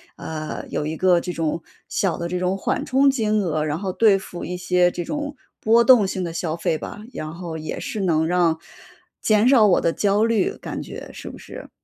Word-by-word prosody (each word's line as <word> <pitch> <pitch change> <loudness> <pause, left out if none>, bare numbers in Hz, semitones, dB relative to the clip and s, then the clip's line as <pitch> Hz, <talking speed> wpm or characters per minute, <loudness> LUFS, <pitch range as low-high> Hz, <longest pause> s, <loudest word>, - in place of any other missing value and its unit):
呃， 155 -1 -6
有 - - -2
一 155 +1 -3
个 180 +1 +4
这 180 +1 -5
种 165 0 -2 0.3
小 190 -5 0
的 170 0 -4
这 180 0 -2
种 185 +1 0
缓 - - -1
冲 270 +2 +4
金 215 -5 +1
额， 155 -3 -1
然 150 +1 -1
后 190 0 -3
对 205 -1 +4
付 180 -2 -7
一 180 - -4
些 180 0 +2
这 175 - -4
种 295 - -4 0.2
波 230 +2 +4
动 235 -5 +6
性 190 -1 -3
的 170 - -3
消 165 -1 -2
费 160 -2 -1
吧， 210 - -8
然 155 0 -5
后 170 -2 -6
也 155 0 -5
是 215 - -4
能 160 -5 +2
让 170 -2 +2 0.6
减 215 +1 +3
少 230 -6 +6
我 180 - +4
的 165 - +2
焦 205 +1 +2
虑 225 -4 +1
感 - - -6
觉， - - -8
是 - - -8
不 - - -10
是？ - - -10
180 Hz, 235 characters per minute, -22 LUFS, 165-210 Hz, 0.6 s, 动